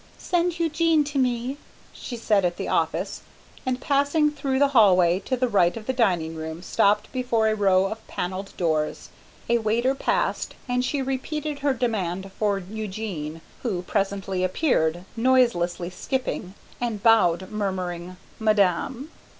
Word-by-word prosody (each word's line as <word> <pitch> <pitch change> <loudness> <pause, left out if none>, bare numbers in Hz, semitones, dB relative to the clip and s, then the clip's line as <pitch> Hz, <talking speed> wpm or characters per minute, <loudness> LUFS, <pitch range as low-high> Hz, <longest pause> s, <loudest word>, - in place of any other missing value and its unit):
"Send 350 -1 0
Eugene 325 -1 +3
to 285 -1 -2
me," 250 +1 0 0.4
she 240 - -7
said 210 -3 +2
at 175 -1 0
the - - -4
office, 165 +4 -1 0.5
and 255 0 0
passing 285 +3 +2
through 275 -2 -2
the 280 +1 +4
hallway 185 -8 +5
to 255 - 0
the 255 +1 +1
right 190 -4 +3
of 220 - -8
the 260 - -1
dining 180 -10 +1
room 160 +1 -6
stopped 205 +2 +2
before 245 -3 +1
a 215 - +2
row 195 -2 +3
of 220 +3 -5
panelled 190 +2 -5
doors. 155 -3 -1 0.4
A 235 0 +3
waiter 230 +4 +1
passed 270 - -1
and 250 0 0
she 275 +2 -1
repeated 285 +3 -3
her 280 -1 +1
demand 195 -6 -2
for 205 -2 +2
Eugene, 190 -5 -5 0.2
who 190 -8 -2
presently 195 -1 -1
appeared, 180 - +1
noiselessly 225 -9 +2
skipping, 205 -4 -3 0.3
and 230 -4 -2
bowed 190 -5 +4
murmuring, 185 -3 -3 0.2
"Madame." 220 - +1
215 Hz, 145 wpm, -25 LUFS, 185-260 Hz, 0.5 s, hallway